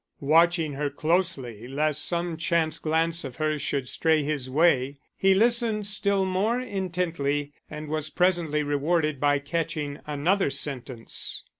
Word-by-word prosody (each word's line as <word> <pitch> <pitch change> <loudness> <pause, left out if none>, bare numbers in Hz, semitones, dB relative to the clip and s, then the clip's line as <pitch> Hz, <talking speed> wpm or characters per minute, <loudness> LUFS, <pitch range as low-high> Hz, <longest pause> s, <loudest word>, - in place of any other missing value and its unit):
Watching 165 +1 +3
her 145 +1 -2
closely 140 - -1
lest 150 +2 0
some 170 -1 -1
chance 170 -1 0
glance 165 +1 +1
of 130 -3 -7
hers 155 -1 -1
should 135 -3 -1
stray 160 +3 +2
his 140 -3 -2
way, 140 -2 +2 0.2
he 195 0 +3
listened 225 -1 +2
still 200 -1 +2
more 200 +6 0
intently 170 - -2 0.2
and 150 0 -7
was 155 0 -2
presently 175 -5 +1
rewarded 150 +1 0
by 145 0 +3
catching 150 0 -3
another 155 +6 +1
sentence. 135 -4 -3
155 Hz, 135 wpm, -26 LUFS, 145-175 Hz, 0.2 s, Watching